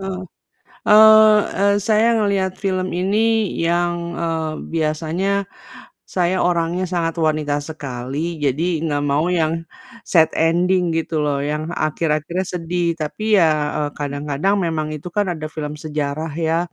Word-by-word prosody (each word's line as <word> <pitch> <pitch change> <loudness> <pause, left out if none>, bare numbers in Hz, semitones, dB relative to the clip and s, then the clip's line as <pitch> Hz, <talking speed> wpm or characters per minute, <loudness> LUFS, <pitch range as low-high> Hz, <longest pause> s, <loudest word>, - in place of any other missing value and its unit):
Eee, 190 -1 -5 0.7
eee 215 0 +8 0.2
eee, 200 0 +4
saya 220 +1 +4
ngelihat 195 -3 0
film 185 -1 0
ini 215 +3 +1
yang, 175 +1 +1 0.2
eee, 160 -2 -2 0.2
biasanya, 165 +5 0 0.6
saya 180 0 0
orangnya 175 +1 0
sangat 170 -2 -2
wanita 155 -2 0
sekali, 145 +2 -5
jadi 160 +4 0
nggak 145 -2 -1
mau 145 +4 +1
yang 165 -1 0 0.4
sad 160 -3 +4
ending 175 +2 +2
gitu 165 -1 -2
loh, 145 -1 0
yang 150 +3 -3
akhir-akhirnya 155 +3 -1
sedih. 175 -1 -2
Tapi 210 +8 0
ya, 165 -2 +5 0.3
eee, 150 -1 -1
kadang-kadang 145 +6 -1
memang 155 -2 -2
itu 150 +4 -8
kan 205 -1 +2
ada 155 -2 -5
film 150 -1 -5
sejarah 150 0 -3
ya, 165 0 +1
165 Hz, 135 wpm, -20 LUFS, 155-185 Hz, 0.7 s, eee